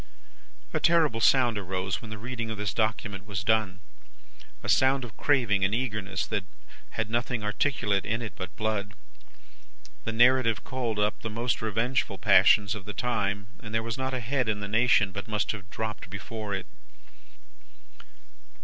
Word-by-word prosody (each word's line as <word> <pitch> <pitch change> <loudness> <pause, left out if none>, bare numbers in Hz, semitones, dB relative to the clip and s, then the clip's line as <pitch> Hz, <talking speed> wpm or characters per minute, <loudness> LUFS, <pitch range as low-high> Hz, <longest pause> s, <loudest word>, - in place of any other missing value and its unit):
A - - +1
terrible 160 -9 +3
sound 120 -4 +4
arose 95 -2 -2
when 110 - -9
the 110 - -6
reading 115 +1 -4
of 110 - -4
this 105 -1 -2
document 110 -2 -1
was 95 -2 -3
done. 105 -3 +1 0.8
A - - -5
sound 130 0 +4
of 110 - -11
craving 115 -9 +2
and 95 +3 +2
eagerness 105 -6 -2
that 105 -3 -2 0.5
had 110 - 0
nothing 120 0 -1
articulate 105 -2 0
in 115 +2 -1
it 110 -6 -6
but 90 -1 -7
blood. 110 -1 -2 1.1
The 115 - -2
narrative 120 -2 +4
called 120 -4 -3
up 105 0 0
the 115 - -4
most 115 +1 -1
revengeful 115 +4 0
passions 100 -2 +5
of 105 -2 -7
the 105 - -5
time, 100 -4 -1 0.2
and 110 -2 -6
there 115 - +1
was 115 -1 -3
not 130 0 -1
a - - -1
head 125 0 0
in 105 -1 0
the 100 - -4
nation 110 -2 +3
but 100 +3 -6
must 105 -1 0
have 95 -3 -8
dropped 105 -4 -5
before 100 +1 -5
it. 95 - -5
110 Hz, 165 wpm, -28 LUFS, 100-120 Hz, 1.1 s, passions